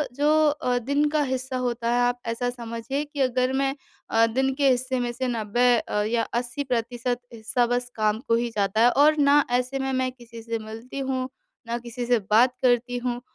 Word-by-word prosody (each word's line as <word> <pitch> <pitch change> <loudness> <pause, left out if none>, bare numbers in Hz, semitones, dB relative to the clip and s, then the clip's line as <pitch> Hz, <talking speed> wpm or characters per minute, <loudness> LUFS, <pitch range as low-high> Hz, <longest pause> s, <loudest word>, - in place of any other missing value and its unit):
जो 290 +1 +2 0.2
अ, 250 -4 -1
दिन 285 +5 +1
का 305 0 +1
हिस्सा 260 -1 -3
होता 235 -2 -1
है 245 - +2
आप 245 0 +1
ऐसा 245 +2 -1
समझिए 240 +4 -4
कि 290 -1 -5
अगर 255 0 +1
मैं 270 +1 0 0.3
अ, 225 0 +4
दिन 265 +3 0
के 280 -1 +3
हिस्से 255 0 0
में 240 -1 -1
से 255 +1 -2
90 235 +1 +1
अ, 210 - -2
या 230 +1 0
80% 245 -1 -2
हिस्सा 230 +2 0
बस 245 0 -1
काम 215 0 +1
को 230 - +3
ही 235 0 0
जाता 200 +2 +1
है 240 - +7
और 305 +2 +4
ना 285 0 +5 0.2
ऐसे 260 +2 -3
में 265 0 -1
मैं 255 0 0
किसी 235 -2 -12
से 230 0 -3
मिलती 225 +5 -8
हूँ, 260 -1 -2 0.4
न 235 - -1
किसी 240 +1 -6
से 240 -1 +3
बात 245 +4 +5
करती 245 0 +2
हूँ 245 0 -3
245 Hz, 200 wpm, -25 LUFS, 235-260 Hz, 0.4 s, है